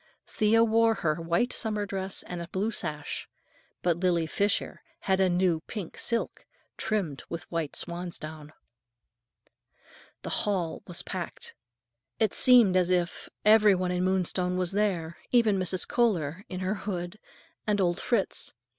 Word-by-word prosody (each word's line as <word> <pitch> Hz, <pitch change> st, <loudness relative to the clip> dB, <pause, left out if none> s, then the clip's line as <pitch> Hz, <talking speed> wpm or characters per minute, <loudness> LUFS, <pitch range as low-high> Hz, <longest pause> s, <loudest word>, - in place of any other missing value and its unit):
Thea 220 Hz, +2 st, +3 dB
wore 225 Hz, 0 st, +3 dB
her 160 Hz, -3 st, -1 dB
white 170 Hz, +9 st, +1 dB
summer 210 Hz, -3 st, -1 dB
dress 195 Hz, -1 st, -3 dB
and 175 Hz, -1 st, -6 dB
a 170 Hz, -, -6 dB
blue 195 Hz, +6 st, -1 dB
sash, 150 Hz, -7 st, -4 dB, 0.5 s
but 175 Hz, -2 st, +2 dB
Lily 175 Hz, -3 st, +2 dB
Fisher 200 Hz, +5 st, -1 dB, 0.2 s
had 190 Hz, -1 st, +1 dB
a 190 Hz, -1 st, +4 dB
new 175 Hz, -2 st, +2 dB
pink 200 Hz, -7 st, -6 dB
silk, 235 Hz, -1 st, -2 dB, 0.3 s
trimmed 185 Hz, -, -2 dB
with 170 Hz, -1 st, -5 dB
white 165 Hz, -4 st, -2 dB
swansdown. 160 Hz, -3 st, -4 dB, 1.7 s
The -, -, -4 dB
hall 180 Hz, -6 st, -1 dB
was 175 Hz, -1 st, -4 dB
packed. 180 Hz, -3 st, -6 dB, 0.6 s
It 220 Hz, -3 st, +1 dB
seemed 240 Hz, -7 st, +6 dB
as 180 Hz, -1 st, +3 dB
if 180 Hz, -1 st, -1 dB, 0.2 s
every 210 Hz, -2 st, +7 dB
one 180 Hz, 0 st, -1 dB
in 180 Hz, 0 st, 0 dB
Moonstone 185 Hz, -1 st, 0 dB
was 180 Hz, -1 st, 0 dB
there, 185 Hz, -5 st, -1 dB
even 225 Hz, -5 st, +4 dB
Mrs. 185 Hz, 0 st, +1 dB
Kohler, 185 Hz, -7 st, 0 dB
in 185 Hz, 0 st, -5 dB
her 185 Hz, +2 st, 0 dB, 0.2 s
hood, 175 Hz, +1 st, -4 dB, 0.5 s
and 210 Hz, -1 st, +2 dB
old 175 Hz, -1 st, +1 dB
Fritz. 225 Hz, -6 st, 0 dB
185 Hz, 145 wpm, -28 LUFS, 170-210 Hz, 1.7 s, every